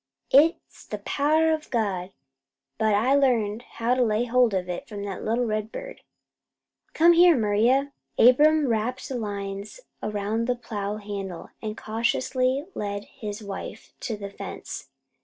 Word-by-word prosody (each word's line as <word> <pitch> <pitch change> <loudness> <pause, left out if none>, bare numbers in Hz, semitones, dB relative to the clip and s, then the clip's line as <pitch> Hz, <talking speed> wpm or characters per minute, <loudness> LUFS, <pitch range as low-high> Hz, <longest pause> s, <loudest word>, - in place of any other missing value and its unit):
It's 305 +5 +3
the - - -5
power 310 +3 +2
o' 315 - +1
God, 195 -6 -1 0.7
but 215 -1 +3
I 235 +6 +3
learned 235 -6 +2
how 235 +2 +1
to 255 - +1
lay 225 0 +2
hold 245 -1 +3
of 180 -1 -1
it 180 -1 -5
from 205 -2 -6
that 195 -2 -5
little 235 +3 +1
red 215 0 -2
bird. - - -8 0.9
Come 340 +2 +6
here, 345 -2 +6
Maria!" 240 +6 +2 0.2
Abram 295 +5 +6
wrapped 240 +3 -1
the 265 - -4
lines 200 - -5 0.2
around 210 +2 -2
the 250 - +1
plow 210 -4 -4
handle, 200 -4 -6
and 215 -1 -5
cautiously 255 +5 0
led 205 0 -3 0.2
his 210 -2 -5
wife 200 -1 -7
to 225 -3 -4
the 200 -1 -7
fence. - - -7
225 Hz, 150 wpm, -25 LUFS, 205-260 Hz, 0.9 s, Come